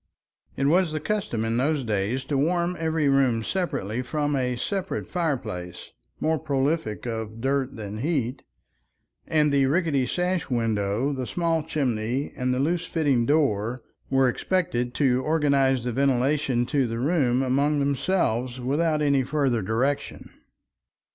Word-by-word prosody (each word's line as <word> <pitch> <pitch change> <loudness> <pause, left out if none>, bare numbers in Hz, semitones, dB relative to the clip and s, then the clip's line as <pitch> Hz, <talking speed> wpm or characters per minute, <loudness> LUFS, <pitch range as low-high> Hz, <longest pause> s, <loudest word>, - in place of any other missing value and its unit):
It 135 - 0
was 170 +3 +3
the 155 - -1
custom 155 - -2
in 115 +1 0
those 145 +2 +1
days 110 +4 -1
to 145 - -2
warm 170 +5 +1
every 160 -2 +1
room 130 -5 +3
separately 125 - -2
from 145 +2 -1
a 125 -2 0
separate 190 - -3
fireplace, 115 - -3 0.3
more 160 0 +1
prolific 140 -6 -1
of 110 -2 -4
dirt 135 +1 -1
than 105 -1 -6
heat, 135 -3 -1 0.9
and 150 -2 +2
the 140 -1 +3
rickety 145 -4 +1
sash 180 -2 -1
window, 115 +2 0
the 130 -2 -4
small 165 -2 0
chimney, 130 -4 -2
and 125 -1 -1
the 125 - 0
loose 165 +5 0
fitting 140 -8 +1
door 125 -6 +1 0.3
were 135 -1 +3
expected 125 -4 -1
to 130 -3 +2
organize 140 -4 +2
the 125 - -2
ventilation 135 0 +1
of 130 0 0
the 115 - -3
room 130 -2 +2
among 140 +3 +1
themselves 130 -4 0
without 150 +4 +1
any 140 -2 +3
further 130 -3 0
direction. 120 +8 -2
135 Hz, 140 wpm, -25 LUFS, 120-155 Hz, 0.9 s, was